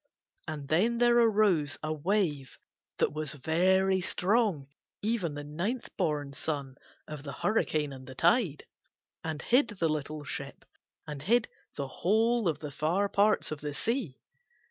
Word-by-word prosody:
And 150 Hz, -3 st, -5 dB
then 210 Hz, +11 st, +2 dB
there 240 Hz, 0 st, +5 dB
arose 205 Hz, -10 st, +3 dB
a 155 Hz, 0 st, -1 dB
wave 155 Hz, -4 st, -1 dB, 0.4 s
that -, -, +1 dB
was 155 Hz, -1 st, -3 dB
very 185 Hz, +6 st, +2 dB
strong, 190 Hz, -, +1 dB, 0.4 s
even 205 Hz, -9 st, 0 dB
the 145 Hz, -, -5 dB
ninth 175 Hz, -, -4 dB
born 150 Hz, -6 st, -1 dB
son 140 Hz, -2 st, -3 dB, 0.3 s
of 150 Hz, -2 st, -7 dB
the 140 Hz, -1 st, -6 dB
hurricane 155 Hz, -7 st, 0 dB
and 130 Hz, -1 st, -11 dB
the 130 Hz, -, -9 dB
tide, 170 Hz, -, +2 dB, 0.6 s
and 160 Hz, -2 st, -3 dB
hid 250 Hz, +2 st, +4 dB
the 190 Hz, -6 st, -1 dB
little 155 Hz, 0 st, -3 dB
ship -, -, -6 dB, 0.4 s
and 150 Hz, -2 st, -6 dB
hid 230 Hz, -, +2 dB, 0.3 s
the 140 Hz, -2 st, -3 dB
whole 220 Hz, -, +2 dB
of 160 Hz, -3 st, +1 dB
the 150 Hz, -1 st, -7 dB
far 175 Hz, +8 st, 0 dB
parts 205 Hz, -2 st, +2 dB
of 155 Hz, -, -5 dB
the 145 Hz, -1 st, -4 dB
sea. 225 Hz, -, -2 dB
160 Hz, 150 wpm, -30 LUFS, 145-210 Hz, 0.6 s, there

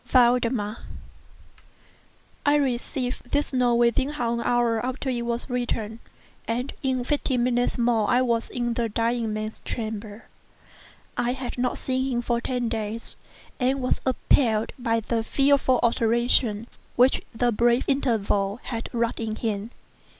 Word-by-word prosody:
VALDEMAR 240 Hz, -3 st, +3 dB, 1.7 s
I 290 Hz, 0 st, +4 dB
received 250 Hz, -2 st, -1 dB
this 290 Hz, 0 st, 0 dB
note 250 Hz, -2 st, +3 dB
within 235 Hz, +3 st, +3 dB
half 245 Hz, -6 st, -1 dB
an 235 Hz, -, -1 dB
hour 235 Hz, -1 st, +1 dB
after 260 Hz, +1 st, -2 dB
it 240 Hz, -1 st, -2 dB
was 235 Hz, 0 st, -2 dB
written, 235 Hz, -3 st, -2 dB, 0.5 s
and 245 Hz, +4 st, -2 dB
in 260 Hz, -2 st, 0 dB
fifteen 255 Hz, -2 st, 0 dB
minutes 245 Hz, 0 st, +1 dB
more 235 Hz, -3 st, +2 dB
I 250 Hz, +1 st, +4 dB
was 235 Hz, -2 st, 0 dB
in 240 Hz, -1 st, -1 dB
the 230 Hz, -1 st, -1 dB
dying 230 Hz, +1 st, 0 dB
man's 215 Hz, 0 st, -4 dB
chamber. 220 Hz, -1 st, -5 dB, 0.9 s
I 240 Hz, +1 st, +1 dB
had 255 Hz, -1 st, -5 dB
not 250 Hz, -1 st, 0 dB
seen 260 Hz, 0 st, -1 dB
him 240 Hz, -, 0 dB
for 235 Hz, 0 st, 0 dB
ten 245 Hz, -1 st, -1 dB
days, 225 Hz, 0 st, -4 dB, 0.4 s
and 260 Hz, +2 st, +1 dB
was 255 Hz, -1 st, 0 dB
appalled 230 Hz, -3 st, +2 dB
by 230 Hz, -2 st, +1 dB
the 225 Hz, +1 st, -1 dB
fearful 275 Hz, 0 st, +3 dB
alteration 230 Hz, -1 st, +2 dB, 0.3 s
which 250 Hz, +2 st, +4 dB
the 240 Hz, +1 st, +2 dB
brief 235 Hz, +2 st, +3 dB
interval 220 Hz, -6 st, +1 dB
had 230 Hz, -2 st, -4 dB
wrought 235 Hz, -1 st, 0 dB
in 220 Hz, -1 st, -2 dB
him. 215 Hz, -1 st, -2 dB
240 Hz, 145 wpm, -25 LUFS, 230-255 Hz, 1.7 s, I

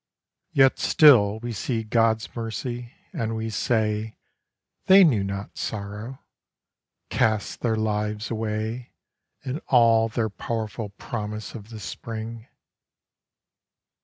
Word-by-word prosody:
Yet 135 Hz, -1 st, +4 dB
still 110 Hz, -9 st, +6 dB
we 120 Hz, 0 st, -4 dB
see 115 Hz, +2 st, -2 dB
God's 110 Hz, 0 st, +1 dB
mercy, 120 Hz, +1 st, -5 dB, 0.2 s
and 115 Hz, -9 st, -2 dB
we 110 Hz, 0 st, -3 dB
say 110 Hz, -1 st, 0 dB, 0.4 s
' -, -, -54 dB
They 190 Hz, +1 st, +9 dB
knew 120 Hz, -, +3 dB
not 100 Hz, +1 st, -5 dB
sorrow, 105 Hz, +5 st, -5 dB, 0.9 s
cast 110 Hz, -2 st, 0 dB
their 115 Hz, -2 st, 0 dB
lives 105 Hz, 0 st, -2 dB
away 110 Hz, +2 st, -3 dB, 0.5 s
In 130 Hz, +4 st, -3 dB
all 115 Hz, -3 st, +5 dB
their 110 Hz, -1 st, -1 dB
powerful 110 Hz, 0 st, -4 dB
promise 105 Hz, +1 st, -6 dB
of 110 Hz, -2 st, -9 dB
the 110 Hz, -2 st, -8 dB
spring. 115 Hz, +2 st, -7 dB
110 Hz, 110 wpm, -25 LUFS, 105-120 Hz, 0.9 s, They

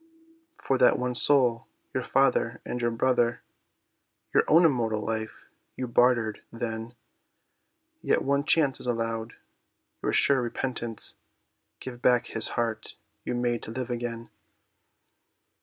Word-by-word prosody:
"For 135 Hz, -1 st, -1 dB
that 125 Hz, -, +5 dB
one 125 Hz, 0 st, -2 dB
soul, 125 Hz, -3 st, +4 dB, 0.3 s
your -, -, -1 dB
father -, -, +1 dB
and 125 Hz, -, -4 dB
your 120 Hz, -, +1 dB
brother, 120 Hz, 0 st, 0 dB, 0.9 s
Your -, -, +4 dB
own 165 Hz, +3 st, +6 dB
immortal 115 Hz, -7 st, 0 dB
life 110 Hz, 0 st, -4 dB, 0.3 s
you 130 Hz, -, -4 dB
bartered; 120 Hz, -3 st, +2 dB
then, 115 Hz, 0 st, -5 dB, 1.1 s
Yet -, -, +1 dB
one 140 Hz, +1 st, +1 dB
chance 145 Hz, -5 st, +3 dB
is -, -, -6 dB
allowed—your 115 Hz, -1 st, -6 dB
sure 135 Hz, -2 st, +3 dB
repentance, 120 Hz, -1 st, -2 dB, 0.6 s
Give 120 Hz, -2 st, -8 dB
back 125 Hz, -2 st, +3 dB
his 115 Hz, -, 0 dB
heart 115 Hz, -2 st, -3 dB, 0.3 s
you -, -, -2 dB
made 120 Hz, -1 st, -1 dB
to -, -, -8 dB
live 125 Hz, +2 st, -5 dB
again." 115 Hz, -1 st, -5 dB
120 Hz, 125 wpm, -27 LUFS, 115-125 Hz, 1.1 s, own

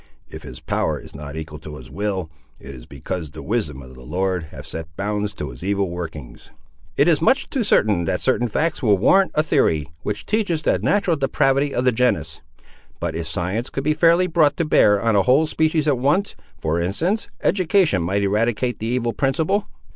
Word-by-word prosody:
If -, -, -10 dB
his -, -, -10 dB
power -, -, -1 dB
is -, -, -13 dB
not 70 Hz, +1 st, -8 dB
equal 80 Hz, -1 st, -7 dB
to 75 Hz, -1 st, -9 dB
his 65 Hz, -1 st, -13 dB
will, 95 Hz, -1 st, -3 dB, 0.3 s
it 70 Hz, -, -10 dB
is 60 Hz, -2 st, -12 dB
because 85 Hz, -5 st, -5 dB
the -, -, -10 dB
wisdom 65 Hz, +1 st, -2 dB
of 65 Hz, 0 st, -13 dB
the 65 Hz, -, -13 dB
Lord 90 Hz, +5 st, -2 dB
hath 75 Hz, -, -11 dB
set 80 Hz, 0 st, -6 dB
bounds 105 Hz, +1 st, -2 dB
to 75 Hz, -7 st, -5 dB
his -, -, -10 dB
evil 100 Hz, -1 st, 0 dB
workings." 80 Hz, -7 st, -8 dB, 0.5 s
"It -, -, +4 dB
is 165 Hz, -3 st, +3 dB
much 260 Hz, -, +2 dB
too 265 Hz, -5 st, 0 dB
certain 105 Hz, -, +2 dB
that 90 Hz, -, -1 dB
certain 125 Hz, -2 st, +1 dB
facts 150 Hz, +9 st, -1 dB
will 105 Hz, -6 st, +4 dB
warrant 190 Hz, -, +4 dB
a 155 Hz, -, +3 dB
theory, 80 Hz, -, +2 dB, 0.2 s
which 105 Hz, 0 st, -4 dB
teaches 195 Hz, -7 st, 0 dB
the -, -, +2 dB
natural 195 Hz, -5 st, +1 dB
depravity 135 Hz, +1 st, +1 dB
of 125 Hz, -, -1 dB
the 125 Hz, -, +5 dB
genus; 125 Hz, +2 st, 0 dB, 0.6 s
but 85 Hz, -2 st, -3 dB
if 80 Hz, 0 st, -3 dB
science 95 Hz, +9 st, -2 dB
could 135 Hz, -, -4 dB
be 155 Hz, +2 st, +2 dB
fairly 170 Hz, +3 st, +4 dB
brought 160 Hz, -4 st, +2 dB
to 170 Hz, -, 0 dB
bear 105 Hz, -8 st, +4 dB
on 115 Hz, 0 st, +1 dB
a 100 Hz, -, +5 dB
whole 130 Hz, +10 st, +4 dB
species 155 Hz, 0 st, 0 dB
at 140 Hz, -4 st, +2 dB
once, 150 Hz, +10 st, +1 dB, 0.2 s
for 80 Hz, +2 st, -1 dB
instance, 165 Hz, -, -1 dB, 0.2 s
education 185 Hz, -, +2 dB
might 95 Hz, +4 st, 0 dB
eradicate 115 Hz, +4 st, 0 dB
the 110 Hz, -, -3 dB
evil 120 Hz, -1 st, -1 dB
principle." 160 Hz, -, 0 dB
110 Hz, 200 wpm, -21 LUFS, -, 0.6 s, the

